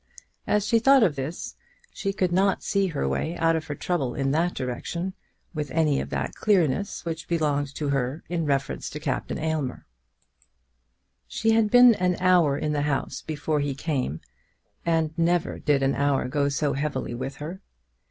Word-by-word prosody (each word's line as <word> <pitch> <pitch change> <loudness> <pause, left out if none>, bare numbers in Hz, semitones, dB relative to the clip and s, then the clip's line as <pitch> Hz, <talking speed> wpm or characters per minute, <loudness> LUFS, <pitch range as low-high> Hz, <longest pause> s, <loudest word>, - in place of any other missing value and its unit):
As 210 -1 +2
she 230 +1 +3
thought 270 +2 +6
of 170 -9 +2
this, 140 +5 -5 0.4
she 195 - -2
could 185 -2 0
not 190 +2 +2
see 200 -2 +1
her 150 - -2
way 70 - -2
out 165 0 +3
of 160 -1 -3
her 145 - -4
trouble 140 -7 -2
in 135 0 0
that 170 +4 +1
direction 170 +9 -3 0.4
with 150 -3 -3
any 155 -4 +2
of - - -6
that - - -3
clearness 195 -2 +1
which 165 -1 -4
belonged 145 -4 0
to 150 -2 -2
her 135 +2 -1
in 170 -3 -2
reference 140 -1 -1
to - - -6
Captain - - -2
Aylmer. 155 -5 -2 1.4
She 225 0 0
had 220 -1 +3
been 245 +1 +8
an 180 -3 0
hour 175 -6 +4
in 150 +1 -1
the 145 - 0
house 145 -2 -2
before 155 0 -2
he 145 -1 -1
came, 135 - -2 0.7
and 160 -2 +1
never 170 0 +1
did 145 -2 +2
an 135 - +2
hour 140 -2 +1
go 140 +2 +1
so 140 0 0
heavily 140 -3 -2
with 130 +3 -5
her. 165 +7 -7
155 Hz, 175 wpm, -25 LUFS, 140-180 Hz, 1.4 s, been